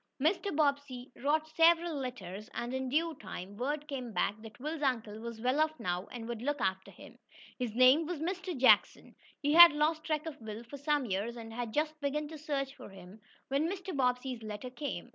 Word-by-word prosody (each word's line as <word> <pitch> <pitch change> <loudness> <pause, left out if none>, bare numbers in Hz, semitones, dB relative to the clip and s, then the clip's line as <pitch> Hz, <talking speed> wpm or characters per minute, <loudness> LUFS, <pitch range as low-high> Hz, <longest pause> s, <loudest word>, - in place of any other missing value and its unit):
Mr. 345 +5 +1
Bobbsey 280 -4 0
wrote 305 +4 0
several 330 +1 +4
letters, 215 -8 -6
and, 240 +1 -3
in 260 0 -2
due 325 +4 +1
time, 190 0 -7
word 290 +6 -3
came 255 -5 -5
back 200 - +1
that 225 +1 -12
Will's 305 +3 -4
uncle 225 -6 -1
was 230 0 -7
well 255 +5 +1
off 315 0 0
now, 180 -2 -2
and 230 -2 -7
would 235 -2 -5
look 290 +3 -1
after 190 -2 -1
him. - - -14 0.4
His 240 -3 -3
name 260 +6 +6
was 350 -3 -3
Mr. 365 +1 -3
Jackson. 255 0 +4 0.3
He 290 +1 +2
had 340 -1 +11
lost 310 +1 +1
track 310 -1 -1
of 300 -5 -7
Will 220 +1 -7
for 260 +5 -9
some 290 -1 0
years 210 +3 -2
and 225 -1 -8
had 235 -1 -4
just 305 +3 -1
begun 295 +2 -2
a 310 - -8
search 275 -2 -2
for - - -11
him, 195 +2 -13 0.3
when 285 +4 +1
Mr. 375 -2 -5
Bobbsey's 250 -2 0
letter 215 +3 -6
came. 275 - -5
270 Hz, 200 wpm, -32 LUFS, 230-305 Hz, 0.4 s, had